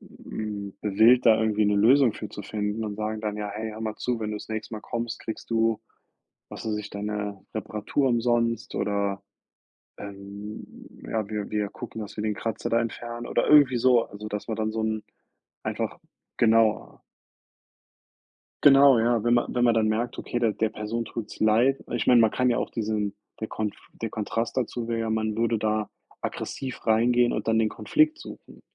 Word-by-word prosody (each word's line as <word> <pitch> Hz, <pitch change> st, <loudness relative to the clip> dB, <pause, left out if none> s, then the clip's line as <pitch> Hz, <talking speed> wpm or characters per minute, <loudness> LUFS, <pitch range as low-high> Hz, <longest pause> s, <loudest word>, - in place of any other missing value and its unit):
hm, 110 Hz, -, -7 dB
gewillt, 110 Hz, +5 st, +5 dB
da 110 Hz, -1 st, +6 dB
irgendwie 110 Hz, -1 st, +2 dB
'ne 105 Hz, 0 st, +3 dB
Lösung 125 Hz, +3 st, +5 dB
für 105 Hz, -, -7 dB
zu 105 Hz, -, -8 dB
finden, 105 Hz, +2 st, -3 dB
und 105 Hz, -1 st, -4 dB
sagen 110 Hz, 0 st, -3 dB
dann: 105 Hz, -1 st, -3 dB
„Ja, 105 Hz, -1 st, -4 dB
hey, 110 Hz, +1 st, -4 dB
hör 110 Hz, +1 st, -9 dB
mal 110 Hz, -1 st, -3 dB
zu, 125 Hz, -2 st, -2 dB
wenn 105 Hz, -1 st, -2 dB
du 105 Hz, -, -3 dB
das -, -, -9 dB
nächste 110 Hz, 0 st, -4 dB
Mal 105 Hz, -, -6 dB
kommst, 115 Hz, +1 st, -4 dB
kriegst 110 Hz, -, -7 dB
du”, 115 Hz, -1 st, +2 dB, 0.7 s
was -, -, -8 dB
weiß 110 Hz, -1 st, -1 dB
ich, 105 Hz, 0 st, -6 dB
„deine 105 Hz, -1 st, -4 dB
Reparatur 110 Hz, +5 st, -1 dB
umsonst 115 Hz, -1 st, +1 dB
oder, 100 Hz, -1 st, -1 dB, 0.7 s
ähm 100 Hz, +1 st, -8 dB, 0.4 s
ja, 110 Hz, -2 st, -2 dB
wir 105 Hz, -2 st, -3 dB
wir 105 Hz, -1 st, -1 dB
gucken, 115 Hz, 0 st, -7 dB
dass 105 Hz, -, -8 dB
wir 105 Hz, -, -2 dB
den 105 Hz, -1 st, -1 dB
Kratzer 115 Hz, +1 st, -3 dB
da 115 Hz, -, +3 dB
entfernen” 120 Hz, +1 st, -5 dB
oder -, -, +1 dB
irgendwie 145 Hz, -4 st, +6 dB
so, 120 Hz, -1 st, +4 dB
also 105 Hz, +1 st, -9 dB
dass 105 Hz, -1 st, -5 dB
man 110 Hz, -, -2 dB
dann 110 Hz, 0 st, -1 dB
so 110 Hz, 0 st, -2 dB
'n 110 Hz, -1 st, -1 dB, 0.6 s
einfach -, -, -3 dB, 0.4 s
genauer 115 Hz, -1 st, +2 dB, 1.6 s
Genau, 140 Hz, -2 st, +8 dB
ja, 115 Hz, -1 st, +2 dB
wenn 120 Hz, -, +3 dB
man 120 Hz, -, +1 dB
wenn 120 Hz, -1 st, +2 dB
man 120 Hz, -, +5 dB
dann 110 Hz, -1 st, +2 dB
merkt, 115 Hz, +3 st, -1 dB
okay, 120 Hz, -, -3 dB
der 115 Hz, -3 st, +2 dB
der 110 Hz, +1 st, 0 dB
Person 110 Hz, +2 st, -4 dB
tut's 110 Hz, -1 st, -7 dB
leid 115 Hz, +5 st, +3 dB
ich 120 Hz, -3 st, -1 dB
meine, 125 Hz, -2 st, +7 dB
man 110 Hz, -1 st, +5 dB
kann 125 Hz, +2 st, +1 dB
ja 120 Hz, -, +1 dB
auch -, -, -1 dB
diesen 105 Hz, -2 st, -2 dB, 0.3 s
der 110 Hz, -, -3 dB
Konf 105 Hz, -2 st, -3 dB, 0.3 s
der 115 Hz, -, -2 dB
Kontrast 115 Hz, +2 st, -2 dB
dazu 120 Hz, -2 st, -2 dB
wäre 115 Hz, -1 st, -1 dB
ja, 115 Hz, 0 st, -1 dB
man 110 Hz, -1 st, 0 dB
würde 115 Hz, 0 st, +1 dB
da 110 Hz, 0 st, 0 dB, 0.3 s
aggressiv 130 Hz, -2 st, -5 dB
reingehen 120 Hz, +2 st, +4 dB
und -, -, -3 dB
dann 110 Hz, 0 st, +3 dB
den 110 Hz, -1 st, +2 dB
Konflikt 310 Hz, +1 st, +2 dB
suchen. -, -, -12 dB
110 Hz, 190 wpm, -26 LUFS, 105-120 Hz, 1.6 s, Genau